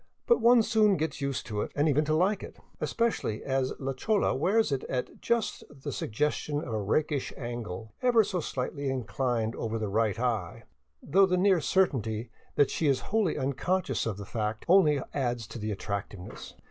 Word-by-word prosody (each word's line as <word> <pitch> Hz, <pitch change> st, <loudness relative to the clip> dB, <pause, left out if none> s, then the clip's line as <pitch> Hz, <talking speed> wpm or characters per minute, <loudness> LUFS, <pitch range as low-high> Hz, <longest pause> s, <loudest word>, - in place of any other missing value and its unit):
But 475 Hz, -, +4 dB
one 235 Hz, -1 st, +6 dB
soon 215 Hz, -3 st, +3 dB
gets 150 Hz, -2 st, -3 dB
used 140 Hz, -1 st, -2 dB
to 105 Hz, -1 st, -3 dB
it, -, -, -4 dB
and 145 Hz, +2 st, +2 dB
even 150 Hz, 0 st, +3 dB
to 155 Hz, +1 st, +1 dB
like 190 Hz, +6 st, +2 dB
it, -, -, -9 dB, 0.2 s
especially 230 Hz, -, -1 dB
as 135 Hz, -1 st, 0 dB
la 135 Hz, 0 st, -3 dB
chola 205 Hz, +10 st, +1 dB
wears 215 Hz, 0 st, +2 dB
it 135 Hz, -1 st, -1 dB
at 125 Hz, -1 st, -4 dB
just 235 Hz, -2 st, 0 dB
the 145 Hz, 0 st, -7 dB
suggestion 145 Hz, +5 st, -1 dB
of 130 Hz, -6 st, -4 dB
a 110 Hz, -, -1 dB
rakish 145 Hz, +7 st, 0 dB
angle, 110 Hz, -4 st, -6 dB
ever 240 Hz, -3 st, +5 dB
so 185 Hz, -2 st, -2 dB
slightly 140 Hz, -1 st, -3 dB
inclined 125 Hz, -3 st, -1 dB
over 115 Hz, 0 st, -3 dB
the 110 Hz, -2 st, -2 dB
right 110 Hz, +1 st, +1 dB
eye, 115 Hz, -8 st, -2 dB, 0.4 s
though 195 Hz, +2 st, +4 dB
the 180 Hz, -1 st, +1 dB
near 185 Hz, -2 st, +4 dB
certainty 120 Hz, -, 0 dB, 0.2 s
that 145 Hz, -, +4 dB
she 160 Hz, -, 0 dB
is 135 Hz, -2 st, +3 dB
wholly 215 Hz, -7 st, +2 dB
unconscious 140 Hz, 0 st, -1 dB
of 105 Hz, -4 st, -3 dB
that 100 Hz, -, -7 dB
fact 110 Hz, 0 st, -3 dB
only 165 Hz, -5 st, +5 dB
adds 120 Hz, -4 st, -1 dB
to 120 Hz, -, -8 dB
the 105 Hz, 0 st, -3 dB
attractiveness. 100 Hz, -2 st, -6 dB
135 Hz, 185 wpm, -29 LUFS, 115-180 Hz, 0.4 s, one